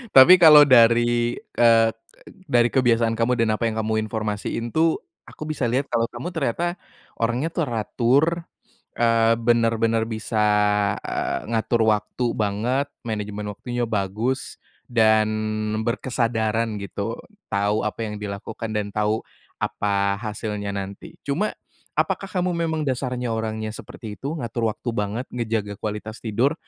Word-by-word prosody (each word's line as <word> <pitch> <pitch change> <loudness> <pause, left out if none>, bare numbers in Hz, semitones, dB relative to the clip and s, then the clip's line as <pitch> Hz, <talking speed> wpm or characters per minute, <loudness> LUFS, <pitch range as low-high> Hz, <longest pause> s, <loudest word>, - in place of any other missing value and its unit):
Tapi 135 +7 +10
kalau, 150 -3 +10
dari 120 -1 +4 0.2
ke 120 -1 +5 0.8
dari 120 -1 +4
kebiasaan 115 -3 +3
kamu, 120 +2 +2
dan 110 -2 +2
apa 115 - -2
yang 110 - -5
kamu 110 0 0
informasiin 110 +1 -3
tuh. 160 0 +3 0.3
Aku - - -16
bisa 150 -4 -1
lihat, 130 +4 0
kalau 115 0 +1
kamu 120 +9 -6
ternyata 170 +3 -1 0.4
orangnya 120 +7 0
teratur, 140 - +1 0.5
eee, 115 -1 +3
benar-benar 115 -1 +2
bisa, 110 -1 -1 0.6
eee, - - -3
ngatur 115 0 +1
waktu 105 +3 -1
banget, 115 +7 0
manajemen 105 -2 -4
waktunya 120 +3 -3
bagus, 110 +5 -2 0.2
dan 110 -3 +4 0.6
berkesadaran 115 -2 -1
gitu, 100 +3 -4 0.3
tahu 105 +1 +1
apa 110 +1 -3
yang 105 -1 -6
dilakukan, 105 +2 -5
dan 105 -1 -2
tahu 105 +1 0 0.3
apa 100 -1 0
hasilnya 105 -2 -4
nanti. 100 0 -7
Cuma, 160 +10 -1 0.4
apakah 195 - 0
kamu 180 -1 -1
memang 160 -2 -1
dasarnya 125 -2 -2
orangnya 110 -1 -3
seperti 110 -1 -9
itu? 150 +4 -3
Ngatur 115 -3 -1
waktu 125 - -5
banget, 105 +4 -2
ngejaga 110 -4 -2
kualitas 105 +1 -5
tidur, 120 +7 +1
115 Hz, 130 wpm, -23 LUFS, 110-125 Hz, 0.8 s, Tapi